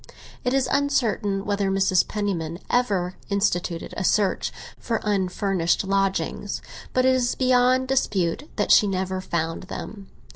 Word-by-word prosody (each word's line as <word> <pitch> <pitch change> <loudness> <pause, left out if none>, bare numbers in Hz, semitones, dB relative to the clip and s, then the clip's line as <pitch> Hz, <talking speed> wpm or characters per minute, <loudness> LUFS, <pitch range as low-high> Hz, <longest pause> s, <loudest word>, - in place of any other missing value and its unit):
It 250 +1 +1
is 270 -1 +2
uncertain 225 -8 +1
whether 200 -1 0
Mrs. 190 -1 +2
Penniman 175 -6 -2
ever 195 -7 +1
instituted 180 -4 -1
a - - -3
search 200 +1 +1 0.3
for 230 -2 -1
unfurnished 190 -3 0
lodgings, 195 0 -1 0.3
but 255 0 +2
it 260 - +5
is 250 -1 +1
beyond 255 0 +3
dispute 230 - 0
that 205 - 0
she 210 - +7
never 190 -1 -2
found 165 -2 -2
them. 200 -2 -7
200 Hz, 135 wpm, -24 LUFS, 185-245 Hz, 0.3 s, she